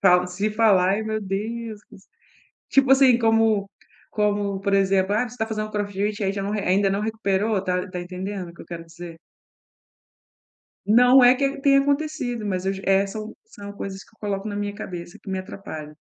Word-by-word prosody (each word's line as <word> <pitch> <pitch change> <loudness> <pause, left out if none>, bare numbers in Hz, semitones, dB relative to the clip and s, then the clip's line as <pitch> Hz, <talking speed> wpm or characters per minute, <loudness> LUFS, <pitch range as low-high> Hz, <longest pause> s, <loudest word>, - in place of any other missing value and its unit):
fal 180 -2 +5
se 200 +4 -2
falar, 210 -4 +4
ai 205 +3 0
meu 220 0 -2
Deus! 215 +3 -4 0.9
Tipo 270 -1 +4
assim, 260 -3 +6
como 225 -3 +2 0.4
como, 205 -2 0
por 200 0 0
exemplo: 195 0 +2
"Ah, 210 - +2
você 240 - -12
está 220 -3 -2
fazendo 215 -1 -4
crossfit? 205 0 -2
Aí 195 -1 +1
já 200 0 -4
não 200 - -3
re 210 - -1
ainda 195 +1 +2
não 195 - 0
recuperou" 210 -1 0
tá 180 +1 -1
tá 180 - -5
entendendo 185 +1 -5
o 170 - -17
que - - -14
eu - - -16
quero 170 -1 -7
dizer? 165 0 -11 1.7
Não 245 +5 +6
é 245 +1 +8
que 275 +1 -1
tenha 275 0 +5
acontecido, 280 -5 -1
mas 185 -2 -2
eu 195 - +1
je 195 - -8
é, 195 +1 +3
são 215 +2 -7
são 205 - -10
coisas 195 -1 -7
que - - -25
eu - - -39
coloco 205 -1 -3
na 205 - -4
minha 205 0 -3
cabeça 175 -4 -8
que 200 - -10
me 190 - -2
atrapalha. 155 -5 -8
205 Hz, 195 wpm, -23 LUFS, 190-220 Hz, 1.7 s, é